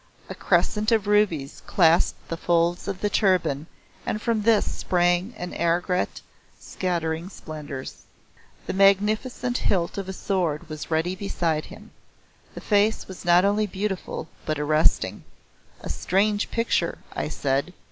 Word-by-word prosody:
A - - -4
crescent 215 +2 +1
of 220 -3 +3
rubies 205 -9 +1
clasped 170 -2 +3
the 165 - -2
folds 170 +2 +1
of 195 -1 -4
the 210 - +1
turban 175 -7 +2 0.4
and 215 - -2
from 225 -1 0
this 220 0 +4
sprang 175 +3 +1
an 180 -2 -6
aigrette 175 +2 0 0.4
scattering 170 -1 -2
splendours. 150 -7 -8 0.6
The - - -3
magnificent 210 +6 +2
hilt 180 0 0
of 195 -1 -5
a - - -3
sword 175 -5 -1
was 155 -1 -6
ready 165 +3 0
beside 170 -5 -1
him. - - -13 0.6
The - - -7
face 210 +1 +2
was 190 -2 -10
not 175 +2 +5
only 210 +1 +2
beautiful 190 -4 -4 0.2
but 155 -1 -2
arresting. 150 -9 +2 0.6
"A - - -7
strange 205 +3 +1
picture," 230 0 0 0.2
I 75 - -2
said. 135 - -1
180 Hz, 135 wpm, -25 LUFS, 160-205 Hz, 0.6 s, not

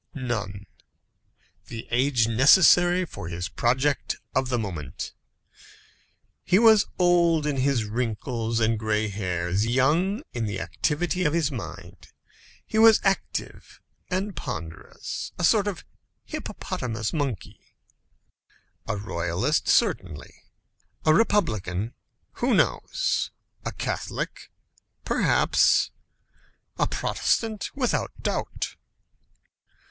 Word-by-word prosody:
None. 105 -7 -4 1.0
The 115 -2 -7
age 125 -1 +2
necessary 175 - +5
for 100 - -8
his 90 +1 -4
project 130 +4 0 0.2
of 130 -1 0
the 125 - +1
moment. 85 - -5 1.3
He 185 - +3
was 220 -1 +6
old 170 -3 +3
in 145 -2 -1
his 130 -3 +1
wrinkles 115 +1 -2
and 110 -1 +1
gray 110 0 0
hairs, 90 0 -1
young 160 - +2
in 115 -2 -2
the 100 -2 -3
activity 175 +4 -1
of 150 -3 +1
his 160 -3 +1
mind. 90 -5 -8 0.6
He 220 - -1
was 225 -1 +8
active 195 -1 -2 0.3
and 195 +1 -2
ponderous; 80 -1 -6
a 175 - -4
sort 205 +3 +4
of 195 -6 -4 0.4
hippopotamus 115 -3 -4
monkey. 140 - -3 1.3
A 105 - -1
royalist, 95 - -1
certainly; 95 - +1 0.7
a 155 - +6
republican 115 - +1 0.5
who - - +3
knows? - - +1 0.3
a - - -3
Catholic, - - -4 0.6
perhaps; - - +3 0.9
a - - +3
Protestant, 220 -3 -1
without 255 -4 0
doubt. - - -3
125 Hz, 100 wpm, -25 LUFS, 105-175 Hz, 1.3 s, was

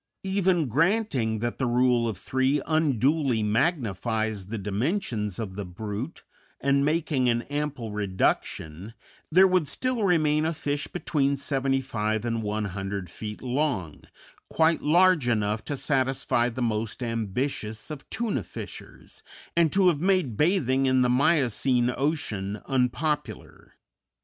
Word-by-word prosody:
Even 190 -4 +1
granting 145 - +1
that 120 0 -3
the 130 - +1
rule 120 -1 +3
of 110 -4 -3
three 130 +2 +1
unduly 140 -5 +2
magnifies 110 - 0
the 115 +2 -4
dimensions 105 - -2
of 105 -5 -5
the 100 - -4
brute, 105 - -6 0.4
and 140 0 +2
making 150 -4 +1
an 120 0 +1
ample 145 -6 -3
reduction, 95 -1 -2 0.4
there 185 +4 +7
would 185 -5 +2
still 250 - -1
remain 155 -5 +3
a 160 +1 -1
fish 145 -1 -2
between 140 -5 0
seventy 135 -1 0
five 110 -3 -2
and 115 -1 -1
one 105 0 -2
hundred 95 -1 -5
feet 105 +1 -7
long, 125 - -1 0.5
quite 160 0 +2
large 170 -2 +4
enough 105 -2 0
to 145 - -3
satisfy 130 -3 +1
the 125 +1 -3
most 110 +1 -2
ambitious 115 +1 -3
of 145 -2 -8
tuna 230 -1 -1
fishers, - - -9 0.3
and 170 -3 +3
to 195 -1 +4
have 160 -5 +2
made 185 - +1
bathing 135 - +2
in 130 -1 +3
the 125 - +2
Miocene 125 -2 +2
ocean 110 -9 -2
unpopular. 135 +3 -2
130 Hz, 135 wpm, -26 LUFS, 110-155 Hz, 0.5 s, there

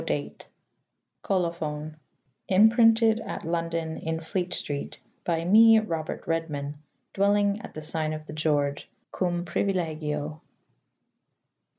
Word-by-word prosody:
d.] - - -2 0.9
[Colo 180 -4 0
phon 155 -2 -5 0.3
:] 130 -1 -47
Imprinted 225 +1 +5
at - - -6
London 165 -1 -2
in 160 0 -3
Flete 175 +2 -3
strete 145 -4 -4 0.2
/ - - -42
b} 165 -1 0
me 225 +4 +7
Robert 165 -8 -3
Red 165 0 -1
man 145 0 -5
/ - - -49
dwelling 205 +1 +2
at - - -11
the 155 - -5
sygne 155 0 -1
of 155 0 -9
the 150 - -9
George 145 -2 0
/ - - -47
Cum 175 -1 -1
priuilegio. 155 -6 -2
165 Hz, 140 wpm, -27 LUFS, 155-195 Hz, 0.9 s, me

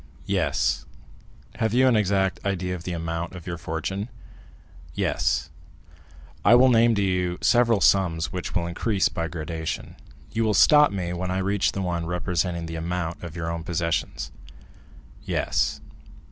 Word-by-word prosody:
"Yes." 65 0 0 0.7
"Have 110 0 +1
you 130 +1 +5
an 125 - +4
exact 95 -2 +1
idea 90 -2 -1
of 85 -2 -7
the 90 - -3
amount 85 0 -3
of 90 - -9
your 85 -2 -5
fortune?" 90 +7 -4 0.9
"Yes." - - 0 0.9
"I 120 - +7
will 130 +1 +6
name 115 -1 +5
to 100 - +1
you 90 -2 0
several 120 -4 +4
sums 85 -5 +2
which 90 -1 -4
will 85 - +1
increase 95 +4 0
by 85 0 -3
gradation; 80 0 -5 0.4
you 115 - 0
will 110 -2 +1
stop 150 +8 +6
me 90 -3 -3
when 90 +1 -3
I 95 - -1
reach 100 +1 +1
the 100 - -2
one 85 -2 -2
representing 90 -1 -1
the 80 0 -5
amount 85 0 -3
of 85 -2 -8
your 85 -1 -3
own 85 0 -4
possessions?" 85 -1 -2 0.9
"Yes." - - -1
90 Hz, 155 wpm, -25 LUFS, 85-100 Hz, 0.9 s, I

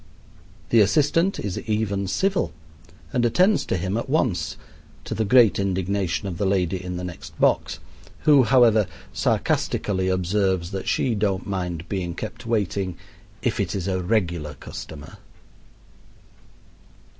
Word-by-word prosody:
The 115 - +5
assistant 150 - +2
is 100 -3 -3
even 105 -3 -1
civil 190 - 0 0.6
and 125 - +2
attends 185 - +3
to - - 0
him 95 +4 -2
at 115 - -4
once, 130 - 0 0.5
to - - -4
the 110 - 0
great 115 -1 +5
indignation 95 -1 -1
of 85 -3 -5
the 100 - +1
lady 95 -1 0
in 90 -1 -4
the 90 - -5
next 90 -2 -8
box, - - +2 0.4
who, 145 -3 +6
however, 115 -4 +5 0.3
sarcastically 95 +8 0
observes 95 -1 0
that 95 -1 -5
she 125 - +1
don't 100 -3 0
mind 90 -4 -3
being 90 -3 -3
kept 115 +4 -7
waiting 100 -5 -1 0.5
"if - - 0
it - - -1
is 95 -2 -3
a 95 -1 0
regular 85 -7 -1
customer." 75 +2 -9
100 Hz, 135 wpm, -24 LUFS, 90-115 Hz, 0.6 s, who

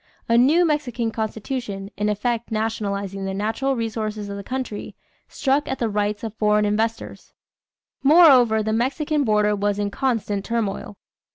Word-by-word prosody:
A 230 - +3
new 295 +9 +5
Mexican 255 -7 -1
constitution, 220 -2 -4
in 210 +2 -1
effect 230 +2 -1
nationalizing 200 -3 -2
the 190 0 -3
natural 225 +7 -1
resources 220 -3 -3
of 200 - -5
the 200 - -7
country, 255 -3 -5 0.3
struck 280 +1 0
at 265 - -2
the 230 - -1
rights 205 +1 -1
of 220 -2 -4
foreign 210 -1 +2
investors. 220 +2 -2 0.7
Moreover 270 -8 +6
the 220 +1 -1
Mexican 285 +6 0
border 210 -3 +2
was 205 0 0
in 205 -1 -2
constant 220 -6 -1
turmoil. 210 -3 -3
220 Hz, 150 wpm, -22 LUFS, 205-250 Hz, 0.7 s, Moreover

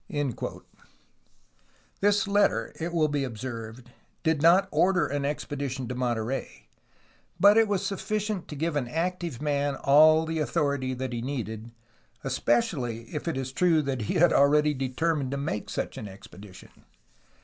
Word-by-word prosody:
'* - - -40 1.9
This 205 +1 +3
letter, 200 - +2
it 165 +1 -3
will 160 -2 +2
be 145 -2 -1
observed, 120 -1 -7 0.3
did 160 -2 +1
not 180 +4 +5
order 185 -1 +3
an 140 0 -2
expedition 140 -3 -3
to 125 - -4
Monterey, 120 - -3 0.7
but 205 +1 +7
it 225 0 +5
was 200 -1 -1
sufficient 210 0 -2
to 150 - -7
give 160 +2 -2
an 135 -4 -1
active 165 -1 -3
man 145 -1 0
all 155 +4 +5
the 160 0 -2
authority 140 -4 0
that 130 0 -4
he 120 - -3
needed, 115 -4 -5 0.5
especially 120 -1 -1
if 150 - -4
it 165 - -1
is 130 -1 -3
true 165 +1 +3
that 135 -3 -2
he - - 0
had 175 0 +5
already 150 +1 +4
determined 135 +2 -1
to 140 - -3
make 140 -8 -3
such - - -4
an 105 - -6
expedition. 95 0 -13
145 Hz, 150 wpm, -27 LUFS, 125-165 Hz, 1.9 s, but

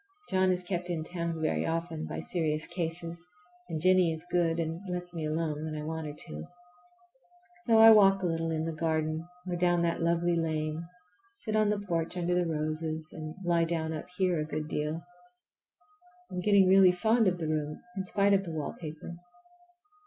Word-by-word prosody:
John 185 0 +3
is 180 0 -1
kept 180 -1 -3
in 165 -3 -2
town 170 -1 -4
very 155 -1 0
often 165 -1 -2
by - - -5
serious 155 -3 -1
cases, 170 0 -4 0.4
and 160 -2 -2
Jennie 185 0 +4
is 160 +1 -5
good 170 -2 +2
and 165 +1 -2
lets 180 0 -4
me 160 -2 -3
alone 155 -1 -2
when 155 -1 -4
I 150 - -5
want 160 0 -4
her 145 - -6
to. 75 +1 -7 1.2
So 230 -2 +5
I 225 0 +10
walk 195 -3 +6
a - - +1
little 165 -1 -1
in 160 0 -1
the 165 - -2
garden 160 0 -1 0.2
or 180 - -1
down 175 0 +2
that 170 0 0
lovely 170 +1 +2
lane, 160 0 -2 0.5
sit 215 -2 -4
on 215 -1 +3
the 210 - +1
porch 175 -3 -2
under 175 0 0
the 175 -1 +1
roses, 155 0 -3
and 155 0 -7
lie 170 -1 +2
down 160 -1 -2
up 155 - -6
here 180 -4 +2
a - - 0
good 155 0 -4
deal. 155 +2 -2 1.3
I'm 180 - -3
getting 200 -1 +5
really 190 -1 +7
fond 220 +4 +3
of 180 -1 +1
the 165 -2 -3
room 150 -1 -2
in 190 - -2
spite 200 +1 +2
of 195 0 +3
the 170 - -6
wallpaper. 155 +2 -6
170 Hz, 190 wpm, -30 LUFS, 155-180 Hz, 1.3 s, I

